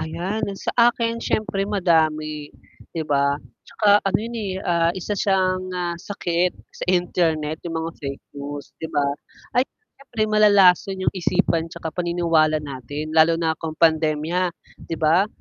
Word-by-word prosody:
Ayan, 180 Hz, +7 st, -3 dB, 0.2 s
sa -, -, -3 dB, 0.2 s
akin 230 Hz, -1 st, -2 dB
siyempre 200 Hz, -2 st, -1 dB
madami 155 Hz, -6 st, +1 dB, 0.4 s
di 165 Hz, -, -1 dB
ba 140 Hz, -2 st, +2 dB, 0.3 s
tsaka 210 Hz, -, 0 dB, 0.2 s
ano 195 Hz, -, +2 dB
yun, 235 Hz, +1 st, -5 dB
eh, 190 Hz, -1 st, -3 dB, 0.4 s
isa 205 Hz, +3 st, -2 dB
siyang, 185 Hz, -2 st, +1 dB, 0.2 s
ah, 170 Hz, -1 st, -2 dB
sakit 180 Hz, -2 st, -1 dB, 0.3 s
sa -, -, -3 dB
internet 160 Hz, -3 st, -1 dB
yung 165 Hz, -1 st, -3 dB
mga 165 Hz, -, -3 dB
fake 140 Hz, -1 st, -6 dB, 0.2 s
news 145 Hz, 0 st, -6 dB
'di 160 Hz, -, -4 dB
ba, 145 Hz, -, +3 dB, 0.6 s
ay 250 Hz, -, +6 dB, 0.4 s
siyempre 245 Hz, -5 st, -4 dB
malalason 195 Hz, -3 st, +5 dB
yung -, -, +2 dB
isipan 165 Hz, -2 st, 0 dB
tsaka 165 Hz, -1 st, -6 dB
paniniwala 165 Hz, -2 st, +1 dB
natin 145 Hz, +2 st, -6 dB
lalo 160 Hz, +1 st, +5 dB
na 160 Hz, -1 st, 0 dB
kung 160 Hz, -1 st, -5 dB
pandemya 160 Hz, +2 st, +2 dB, 0.4 s
'di -, -, -3 dB
ba 165 Hz, +6 st, +4 dB
165 Hz, 145 wpm, -22 LUFS, 155-190 Hz, 0.6 s, ay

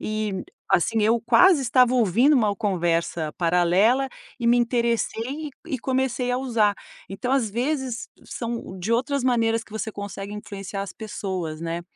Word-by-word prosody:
e, 215 Hz, -3 st, -2 dB, 0.3 s
assim, 220 Hz, +5 st, +2 dB
eu 225 Hz, +2 st, +3 dB
quase 275 Hz, -, +5 dB
estava 250 Hz, 0 st, +4 dB
ouvindo 240 Hz, -, +4 dB
uma 215 Hz, -5 st, +2 dB
conversa 170 Hz, -6 st, -1 dB
paralela, 180 Hz, +10 st, +3 dB, 0.3 s
e 235 Hz, -, -2 dB
me 240 Hz, -, +5 dB
interessei 240 Hz, +4 st, -1 dB
e -, -, -12 dB, 0.2 s
e -, -, -2 dB
comecei 260 Hz, 0 st, -1 dB
a 250 Hz, -, 0 dB
usar, 225 Hz, -6 st, +2 dB, 0.3 s
então, 195 Hz, +6 st, -4 dB
às 260 Hz, -5 st, +2 dB
vezes, 260 Hz, -, -2 dB, 0.2 s
são 230 Hz, -5 st, -5 dB
de 195 Hz, +6 st, -2 dB
outras 265 Hz, +3 st, 0 dB
maneiras 230 Hz, -3 st, +2 dB
que 215 Hz, -, -18 dB
você 220 Hz, 0 st, -3 dB
consegue 200 Hz, 0 st, -6 dB
influenciar 200 Hz, -2 st, -6 dB
as 200 Hz, -, -7 dB
pessoas, 185 Hz, -7 st, -5 dB
né. 170 Hz, +1 st, -3 dB
225 Hz, 155 wpm, -24 LUFS, 195-250 Hz, 0.3 s, quase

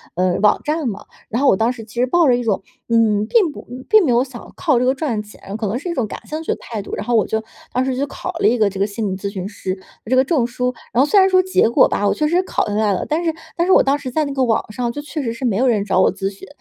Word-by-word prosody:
呃， 180 Hz, 0 st, +1 dB
网 210 Hz, -, +4 dB
站 305 Hz, -1 st, -1 dB
嘛。 210 Hz, -1 st, -7 dB, 0.2 s
然 230 Hz, -, -1 dB
后 -, -, +4 dB
我 -, -, +6 dB
当 225 Hz, +5 st, +1 dB
时 240 Hz, -3 st, -8 dB
其 215 Hz, -, -15 dB
实 245 Hz, +1 st, +2 dB
抱 340 Hz, +4 st, +3 dB
着 250 Hz, -, +5 dB
一 245 Hz, -, -2 dB
种， 210 Hz, -4 st, 0 dB, 0.3 s
嗯， 220 Hz, -3 st, +3 dB
并 375 Hz, -, +3 dB
不 -, -, -11 dB, 0.2 s
并 435 Hz, -2 st, +6 dB
没 260 Hz, -, +2 dB
有 240 Hz, +1 st, +3 dB
想 255 Hz, -3 st, -11 dB
靠 295 Hz, -9 st, +2 dB
这 250 Hz, -, +1 dB
个 260 Hz, -, +3 dB
赚 260 Hz, -8 st, -2 dB
钱， 205 Hz, -1 st, -10 dB
可 220 Hz, -1 st, -2 dB
能 210 Hz, +5 st, -1 dB
是 325 Hz, +7 st, -5 dB
一 -, -, -1 dB
种 250 Hz, -9 st, -1 dB
感 -, -, -7 dB
兴 310 Hz, +1 st, -4 dB
趣 -, -, -2 dB
的 -, -, -8 dB
态 220 Hz, -3 st, -5 dB
度。 200 Hz, -, -6 dB
然 -, -, -5 dB
后 240 Hz, -, +1 dB
我 220 Hz, -, +3 dB
就 220 Hz, 0 st, -1 dB, 0.3 s
当 255 Hz, -, +1 dB
时 260 Hz, -1 st, -1 dB
就 280 Hz, -, 0 dB
考 365 Hz, -, -5 dB
了 -, -, +3 dB
一 235 Hz, +3 st, +3 dB
个 215 Hz, -3 st, +3 dB
这 195 Hz, 0 st, -7 dB
个 200 Hz, -, +2 dB
心 215 Hz, +1 st, -4 dB
理 190 Hz, -, -3 dB
咨 200 Hz, +1 st, -4 dB
询 190 Hz, -2 st, -5 dB
师， 190 Hz, -2 st, -4 dB, 0.3 s
这 250 Hz, +4 st, +1 dB
个 260 Hz, -, +5 dB
证 270 Hz, -3 st, +1 dB
书， 250 Hz, +1 st, -2 dB, 0.2 s
然 250 Hz, -, +4 dB
后 -, -, +3 dB
虽 410 Hz, -, +5 dB
然 380 Hz, 0 st, +5 dB
说 370 Hz, -1 st, +5 dB
结 375 Hz, -10 st, +2 dB
果 235 Hz, -, +5 dB
吧， 205 Hz, -, 0 dB
我 -, -, +3 dB
确 305 Hz, -, -1 dB
实 345 Hz, +4 st, +2 dB
考 -, -, -1 dB
下 205 Hz, -, -3 dB
来 210 Hz, -1 st, +2 dB
了， 185 Hz, -, -2 dB
但 315 Hz, +3 st, 0 dB
是 330 Hz, -1 st, 0 dB, 0.2 s
但 340 Hz, -, +2 dB
是 380 Hz, -, +5 dB
我 -, -, +6 dB
当 275 Hz, +1 st, +2 dB
时 260 Hz, -, -5 dB
在 305 Hz, +5 st, 0 dB
那 280 Hz, -, -4 dB
个 265 Hz, -1 st, +1 dB
网 225 Hz, -2 st, 0 dB
上 240 Hz, +2 st, -2 dB
就 290 Hz, -, -6 dB
确 300 Hz, +1 st, -5 dB
实 230 Hz, -4 st, -2 dB
是 230 Hz, -, -9 dB
没 225 Hz, -6 st, +1 dB
有 260 Hz, +4 st, +2 dB
人 215 Hz, -5 st, +2 dB
找 195 Hz, -2 st, +1 dB
我 185 Hz, -, +4 dB
咨 195 Hz, 0 st, -2 dB
询， 195 Hz, 0 st, -12 dB
240 Hz, 355 characters per minute, -19 LUFS, 210-285 Hz, 0.3 s, 我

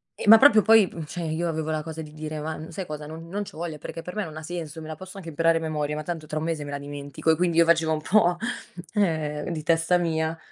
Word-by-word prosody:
E -, -, -6 dB
ma 225 Hz, -, +12 dB
proprio 220 Hz, -4 st, +7 dB
poi 220 Hz, -3 st, +6 dB
p 165 Hz, -, -7 dB
cioè 175 Hz, +3 st, -5 dB
io 160 Hz, +2 st, -1 dB
avevo 160 Hz, -1 st, -2 dB
la 155 Hz, -1 st, -1 dB
cosa 160 Hz, 0 st, -6 dB
di 150 Hz, -1 st, -10 dB
dire: 155 Hz, 0 st, -5 dB
"Ma 155 Hz, +1 st, -5 dB
sai 185 Hz, +3 st, -5 dB
cosa? 150 Hz, -2 st, -6 dB
Non 160 Hz, +2 st, -9 dB
non 205 Hz, +3 st, -2 dB
c'ho 195 Hz, -, -11 dB
voglia! 165 Hz, -2 st, -4 dB
Perché 165 Hz, -, -7 dB
per 180 Hz, -, -8 dB
me 210 Hz, -, -1 dB
non 155 Hz, -1 st, -8 dB
senso! 165 Hz, -1 st, -6 dB
Me 155 Hz, -, -8 dB
la 155 Hz, -, -5 dB
posso 185 Hz, +4 st, -11 dB
anche 175 Hz, -4 st, -7 dB
imparare 165 Hz, +1 st, +3 dB
a -, -, -9 dB
memoria 150 Hz, -2 st, -2 dB
ma 155 Hz, -, -4 dB
tanto 165 Hz, -1 st, -4 dB
tra 155 Hz, 0 st, -4 dB
1 155 Hz, -, -3 dB
mese 165 Hz, -3 st, -2 dB
me 145 Hz, -, -6 dB
la 140 Hz, -, -3 dB
dimentico" 145 Hz, +2 st, -2 dB
e -, -, +4 dB
quindi 175 Hz, -2 st, +1 dB
io 170 Hz, -, +7 dB
facevo 165 Hz, -1 st, +3 dB
un 155 Hz, -, -2 dB
po' 180 Hz, -1 st, +3 dB, 0.6 s
ehm, 155 Hz, -6 st, 0 dB
di 155 Hz, -2 st, -4 dB
testa 165 Hz, +2 st, +3 dB
mia. 160 Hz, -1 st, -1 dB
160 Hz, 280 wpm, -25 LUFS, 155-175 Hz, 0.6 s, ma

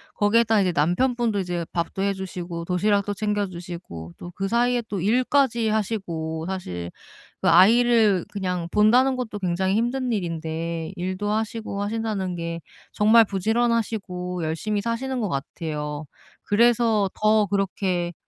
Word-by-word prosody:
거기에다 220 Hz, +1 st, +3 dB
이제 185 Hz, -2 st, +2 dB
남편분도 215 Hz, -, +1 dB
이제 175 Hz, -2 st, -2 dB
밥도 170 Hz, +2 st, -2 dB
해 200 Hz, 0 st, +1 dB
주시고 175 Hz, -3 st, -6 dB
도시락도 200 Hz, +3 st, +1 dB
챙겨 205 Hz, 0 st, -1 dB
주시고 170 Hz, -, -8 dB
또 175 Hz, -, -9 dB
그 195 Hz, -, -2 dB
사이에 240 Hz, +3 st, +2 dB
또 200 Hz, -5 st, -3 dB
일까지 240 Hz, +2 st, +2 dB
하시고 175 Hz, -7 st, -2 dB
사실 90 Hz, -, -5 dB, 0.5 s
그 -, -, +3 dB
아이를 215 Hz, +1 st, +5 dB
그냥 180 Hz, -4 st, -3 dB
본다는 245 Hz, +6 st, +4 dB
것도 225 Hz, -4 st, -4 dB
굉장히 190 Hz, +1 st, 0 dB
힘든 245 Hz, +2 st, 0 dB
일인데 165 Hz, -2 st, -3 dB
일도 185 Hz, +3 st, -3 dB
하시고 220 Hz, -1 st, -3 dB
하신다는 205 Hz, -4 st, -2 dB
게 170 Hz, 0 st, -4 dB, 0.3 s
정말 220 Hz, +2 st, +6 dB
부지런하시고 200 Hz, -4 st, -1 dB
열심히 205 Hz, +7 st, -2 dB
사시는 245 Hz, +3 st, -2 dB
것 210 Hz, -, -1 dB
같아요. 150 Hz, +1 st, -4 dB, 0.4 s
그래서 225 Hz, -2 st, +3 dB
더 215 Hz, -1 st, +3 dB
그렇게 185 Hz, -3 st, -1 dB
200 Hz, 310 characters per minute, -24 LUFS, 175-225 Hz, 0.5 s, 정말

